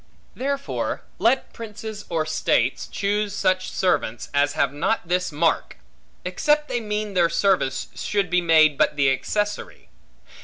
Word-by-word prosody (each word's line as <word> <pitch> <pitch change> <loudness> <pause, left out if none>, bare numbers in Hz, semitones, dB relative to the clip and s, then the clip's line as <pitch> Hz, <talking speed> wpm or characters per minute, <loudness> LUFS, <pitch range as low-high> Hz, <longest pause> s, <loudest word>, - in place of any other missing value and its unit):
Therefore, 280 +1 -3 0.2
let 255 +3 +2
princes, 220 -1 -7
or 160 -2 0
states, 155 - 0
choose 205 0 -1
such 185 -2 +1
servants, 180 -11 -1
as 145 0 +2
have - - +1
not 170 +6 -1
this 180 0 0
mark; 160 +3 0 0.5
except 295 +12 +1
they 240 - 0
mean 210 -2 -3
their 175 -2 +3
service 170 -6 +1
should 205 -2 -1
be 180 0 +3
made 155 -3 +4
but 150 0 +3
the 140 -2 +3
accessory. 205 +10 -3
185 Hz, 140 wpm, -23 LUFS, 155-210 Hz, 0.5 s, made